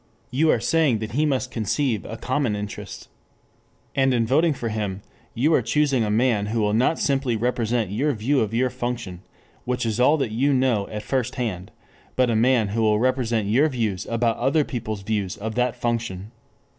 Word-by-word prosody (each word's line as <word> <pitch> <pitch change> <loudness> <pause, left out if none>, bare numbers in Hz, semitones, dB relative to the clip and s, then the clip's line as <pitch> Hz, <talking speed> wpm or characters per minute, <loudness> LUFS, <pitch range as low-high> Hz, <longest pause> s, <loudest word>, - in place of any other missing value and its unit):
You 150 +5 +2
are - - +3
saying 155 -8 +2
that 110 0 -5
he 150 +5 +1
must 130 -3 -1
conceive 115 0 -1
a 115 - -6
common 130 -1 -1
interest. 105 0 -7 0.9
And 135 -2 +2
in 115 -1 +2
voting 155 +8 +3
for 120 -3 -3
him 105 -3 -3 0.3
you 145 +7 +2
are 135 - +4
choosing 135 +1 +1
a 105 - -1
man 110 -2 +2
who 115 +2 -1
will 105 -1 +1
not 125 +8 +2
simply 135 -4 0
represent 115 -2 -1
your 135 +9 +1
view 130 +5 +1
of 110 -3 0
your 125 +2 +1
function, 120 -7 -4 0.4
which 125 0 -2
is 110 0 -1
all 145 +5 +5
that 135 -7 -2
you 135 +6 +1
know 125 -6 +1
at 105 0 -6
first 130 -2 -1
hand, 100 -7 -3 0.5
but 125 -2 +2
a - - +1
man 115 -2 +3
who 115 +3 -1
will 105 -1 +3
represent 120 -3 0
your 135 +9 +3
views 110 -8 -2
about 115 0 0
other 135 +5 +2
people's 110 -7 -5
views 100 -2 -2
of 110 +2 -4
that 125 0 0
function. 115 -5 -3
120 Hz, 195 wpm, -23 LUFS, 110-130 Hz, 0.9 s, all